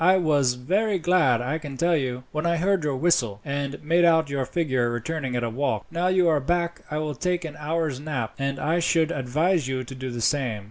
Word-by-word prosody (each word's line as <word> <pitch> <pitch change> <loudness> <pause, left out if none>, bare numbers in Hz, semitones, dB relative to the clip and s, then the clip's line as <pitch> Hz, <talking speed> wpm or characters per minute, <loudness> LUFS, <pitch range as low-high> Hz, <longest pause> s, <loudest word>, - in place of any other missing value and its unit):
I 185 +2 +6
was 145 -7 +2
very 195 - 0
glad, 160 -9 +3
I 140 +6 -2
can 145 -4 -8
tell 170 +4 +2
you, 130 -4 -2
when 155 0 -2
I 170 0 +1
heard 190 0 +1
your 145 -2 0
whistle, 130 -9 +1
and 140 0 -3
made 170 +3 +3
out 160 -3 +4
your 135 -2 -1
figure 130 -8 0
returning 130 +2 -3
at 120 - -1
a 115 - -1
walk. 140 +5 -1
Now 175 +2 0
you 185 -1 +3
are 155 -3 +3
back 170 +4 -1
I 150 - -3
will 155 -1 -2
take 180 +4 -1
an 155 -1 -7
hour's 155 -3 -2
nap, 135 -7 -3
and 135 0 -1
I 160 +5 0
should 165 -1 +2
advise 150 +4 0
you 130 -1 -2
to 130 - -9
do 130 0 -5
the 120 -1 -5
same." 120 -2 0
150 Hz, 230 wpm, -25 LUFS, 130-170 Hz, -, I